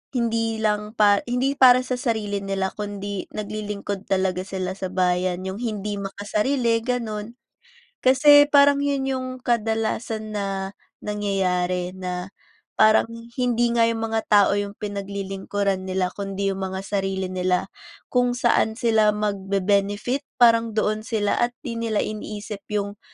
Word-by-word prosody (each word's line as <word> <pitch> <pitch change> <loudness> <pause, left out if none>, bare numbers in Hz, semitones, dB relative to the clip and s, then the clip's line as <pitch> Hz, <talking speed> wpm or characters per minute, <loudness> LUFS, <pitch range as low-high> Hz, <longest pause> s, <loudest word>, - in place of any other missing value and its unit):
hindi 225 -1 0
lang 210 0 0
pa 205 -1 +5
hindi 250 +3 +1
para 255 -1 +7
sa 255 0 -2
sarili 215 -5 -1
nila 195 -1 -2
kundi 205 -1 -4
naglilingkod 205 -1 -5
talaga 190 -1 0
sila 190 0 -4
sa 185 -1 -5
bayan, 180 0 +1
yung 190 - -5
hindi 210 -3 -3
makasarili, 215 +5 0
ganun. 230 -3 -3 0.7
Kasi 290 +3 +6
parang 285 0 +5
yun 280 -2 0
yung 260 -1 -2 0.2
kadalasan 220 -1 -1
na 200 -1 -2 0.6
nangyayari 185 -3 -1
na 180 0 -5 0.5
parang 215 +1 +5 0.3
hindi 240 -1 +2
nga 230 -1 +3
yung 225 -1 -1
mga 225 0 0
tao 205 -2 +5
yung 205 0 -2
pinaglilingkuran 200 -1 -3
nila 185 -1 -1
kundi 195 0 -2
yung 195 - -5
mga 190 0 -4
sarili 195 -2 -2
nila. 180 0 0 0.4
Kung 245 -1 +2
saan 220 -2 +2
sila 220 -3 +3
magbe-benefit 200 +5 0
parang 230 -2 +4
doon 215 0 +1
sila 215 -3 -1
at 240 0 0
'di 230 -4 -4
nila 225 -2 0
iniisip 210 -1 -6 0.2
yung 200 0 -3
210 Hz, 135 wpm, -23 LUFS, 195-230 Hz, 0.7 s, para